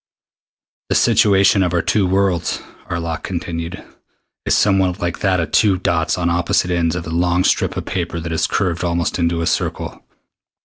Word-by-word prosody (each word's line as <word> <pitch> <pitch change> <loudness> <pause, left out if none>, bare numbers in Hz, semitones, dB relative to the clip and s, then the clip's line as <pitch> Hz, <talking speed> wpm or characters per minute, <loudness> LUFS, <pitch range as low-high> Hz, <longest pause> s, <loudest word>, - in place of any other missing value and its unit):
"The - - +1
situation 100 -4 +4
of 90 -1 0
our 85 - +1
two 100 -3 +1
worlds," 95 -2 0 0.3
Arlok 85 -1 -3
continued, 85 0 -5 0.6
"is - - +3
somewhat 95 -2 +2
like 85 -3 -3
that 95 -2 +1
of 85 - -3
two 100 -4 +3
dots 85 -2 0
on 85 -1 -1
opposite 85 +1 +1
ends 85 -1 0
of 90 - -4
a 80 - -6
long 90 +2 +1
strip - - +1
of - - -4
paper 85 -2 -3
that 85 +1 -5
is 80 - 0
curved 90 -2 -1
almost 85 0 -1
into 85 0 0
a - - -1
circle. 80 - -2
85 Hz, 175 wpm, -19 LUFS, 85-95 Hz, 0.6 s, situation